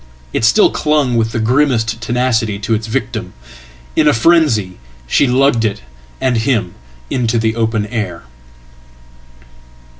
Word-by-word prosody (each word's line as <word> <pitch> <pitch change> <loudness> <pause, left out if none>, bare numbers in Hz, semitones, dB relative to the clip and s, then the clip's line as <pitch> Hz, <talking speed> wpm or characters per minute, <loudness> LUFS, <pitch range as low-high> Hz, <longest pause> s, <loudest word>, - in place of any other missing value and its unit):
It - - -1
still 205 - +4
clung 150 -5 +1
with 115 -1 0
the - - -3
grimmest 115 -1 +1
tenacity 115 -3 0
to 105 +3 -2
its 110 0 -2
victim. 110 -5 -4 0.6
In 150 - +3
afrenzy, 125 - +2 0.3
she 135 - +2
lugged 125 -2 +2
it 105 -1 -2 0.4
and 125 -2 +1
him 110 -6 0 0.4
into 120 -2 0
the 110 0 0
open 110 -2 0
air. 105 -6 -4
115 Hz, 125 wpm, -15 LUFS, 110-130 Hz, 0.6 s, still